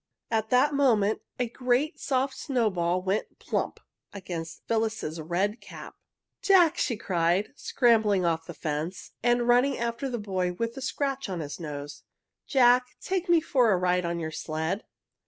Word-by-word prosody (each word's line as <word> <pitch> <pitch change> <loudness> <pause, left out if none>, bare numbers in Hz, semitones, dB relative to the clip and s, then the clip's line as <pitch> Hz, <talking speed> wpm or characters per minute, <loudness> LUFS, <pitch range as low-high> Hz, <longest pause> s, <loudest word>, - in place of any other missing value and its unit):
At 220 -1 0
that 255 +5 +4
moment 225 -7 +2 0.2
a 250 - +1
great 255 +6 0
soft 265 0 0
snowball 185 - 0
went 195 +3 -2
plump! - - -3 0.3
against 175 -5 -7
Phyllis's 220 -8 -1
red 185 +7 -1
cap. - - -10 0.5
"Jack!" 370 -5 +5
she 235 -6 0
cried, 180 +4 0
scrambling 220 -9 +2
off 165 -1 0
the - - -8
fence 155 +4 -4
and 240 0 +2
running 250 +3 +4
after 235 +3 -2
the 245 - -2
boy 185 -4 -2
with 230 +5 -3
the 270 - -8
scratch 275 -2 -2
on 180 -3 -3
his 150 +1 -6
nose. 145 -3 -7 0.5
"Jack, 250 -1 +5
take 370 -1 -2
me 340 -1 +6
for 250 -7 +3
a 190 - +3
ride 180 0 +1
on 170 0 -2
your 160 -1 -4
sled!" 160 +5 -3
215 Hz, 155 wpm, -27 LUFS, 175-250 Hz, 0.5 s, me